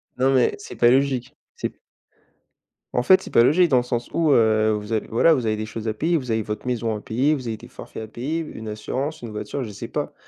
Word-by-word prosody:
Non 130 +2 +2
mais, 125 -2 +3
c'est 205 - -10
pas 120 - +5
logique. 130 -1 +1 0.2
C'est - - -3 1.2
en 125 - +1
fait, 190 +6 +6
c'est - - -9
pas 115 - +6
logique 175 +8 +5
dans 130 - +4
le 120 - +2
sens 120 -1 -3
où, 160 -3 +2
heu, 110 -3 +4
vous 105 +1 -3
avez 110 - -1
voilà, 160 +9 +4
vous 125 -5 0
avez 110 -1 0
des 110 - -3
choses 110 0 -6
à 110 - 0
payer. 160 +10 0
Vous 125 -5 -4
avez 110 0 +1
votre 105 +3 -5
maison 115 -3 -1
à 105 - -6
payer, 135 +7 +1
vous 130 -3 -6
avez 110 -1 -3
des - - -13
forfaits 110 - -9
à - - -8
payer, 135 +9 -3
une 110 -9 -7
assurance, 130 +8 -4
une 120 -2 -7
voiture, 105 +6 -4
je 110 - -6
sais 100 - -7
pas. - - -3
120 Hz, 255 wpm, -23 LUFS, 110-140 Hz, 1.2 s, fait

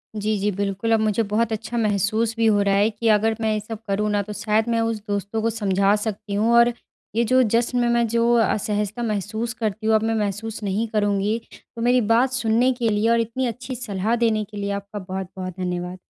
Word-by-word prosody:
जी 215 0 -1
जी, 205 +2 +1
बिल्कुल। 200 +3 -2
अब 225 - +4
मुझे 215 +1 +1
बहुत 225 +2 +1
अच्छा 225 +2 -4
महसूस 215 +1 +1
भी 230 - +2
हो 210 -2 +4
रहा 200 -1 +2
है 205 +2 +3
कि 225 +1 -3
अगर 220 +1 +3
मैं 220 -1 +1
ये 215 - 0
सब 215 +1 -7
करूँ 205 +2 0
ना 205 0 +1
तो 210 - -7
शायद 215 +2 0
मैं 230 -1 +1
उस 225 -1 -1
दोस्तों 205 +2 -2
को 225 - +1
समझा 200 -2 +2
सकती 210 -1 -4
हूँ 220 +3 +2
और 235 0 +5 0.4
ये 235 - +3
जो 255 +3 +4
जश्न 235 +2 +1
में 240 - +2
मैं 235 0 +2
जो 235 +1 +2
असहजता 210 0 0
महसूस 220 +2 -2
करती 220 -1 -3
हूँ 220 - +4
अब 215 - +2
मैं 225 0 0
महसूस 215 +1 -3
नहीं 205 +3 -1
करूँगी। 205 0 0 0.4
तो 230 - -6
मेरी 245 +1 +3
बात 250 +3 +3
सुनने 245 0 +2
के 240 -2 -1
लिए 210 +1 +1
और 235 - +3
इतनी 235 +3 -2
अच्छी 250 +2 -5
सलाह 220 -2 -1
देने 225 -2 +1
के 210 0 -11
लिए 200 0 -2
आपका 200 +1 -5
बहुत-बहुत 185 -1 -6
धन्यवाद। 180 0 -3
215 Hz, 225 wpm, -23 LUFS, 205-230 Hz, 0.4 s, और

